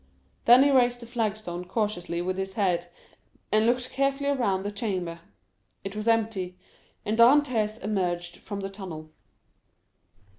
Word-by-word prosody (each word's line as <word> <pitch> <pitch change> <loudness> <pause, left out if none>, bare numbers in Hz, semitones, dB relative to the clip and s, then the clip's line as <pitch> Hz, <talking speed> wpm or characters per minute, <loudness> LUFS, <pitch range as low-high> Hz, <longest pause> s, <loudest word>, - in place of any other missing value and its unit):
Then 245 +3 +8
he 285 - +4
raised 245 -2 +3
the 235 - -9
flag 225 -3 -1
stone 175 -4 -6
cautiously 180 -4 -2
with 185 +1 -2
his 190 0 -4
head, 180 -4 +1 0.6
and 215 +1 +4
looked 245 +1 +1
carefully 275 +1 0
around 200 -9 0
the 205 - -3
chamber. 185 -6 -3 0.6
It 195 +1 -6
was 215 +1 -4
empty, 215 -5 0 0.5
and 215 - 0
Dantès 235 -3 +4
emerged 175 -4 -2
from 200 -1 -6
the 195 - -4
tunnel. 165 -6 -8
210 Hz, 145 wpm, -27 LUFS, 185-235 Hz, 0.6 s, Then